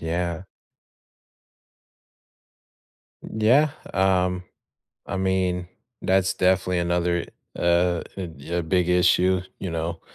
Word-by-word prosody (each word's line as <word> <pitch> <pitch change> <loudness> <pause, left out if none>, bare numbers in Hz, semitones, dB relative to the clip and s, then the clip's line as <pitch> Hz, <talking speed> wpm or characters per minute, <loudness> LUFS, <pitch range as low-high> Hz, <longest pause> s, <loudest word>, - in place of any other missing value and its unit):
Yeah. 85 +1 -2 2.8
Yeah, 125 +8 +3 0.2
um, 90 -1 +1 0.6
I 100 - -3
mean, 95 -2 0 0.3
that's 95 0 +2
definitely 90 -1 +2
another, 85 0 0 0.3
uh, 85 0 +2
a 85 -2 -5
a - - 0
big 90 +1 +1
issue, 90 +1 +3 0.2
you 95 - -4
know, 85 0 -3
90 Hz, 90 wpm, -24 LUFS, 85-95 Hz, 2.8 s, Yeah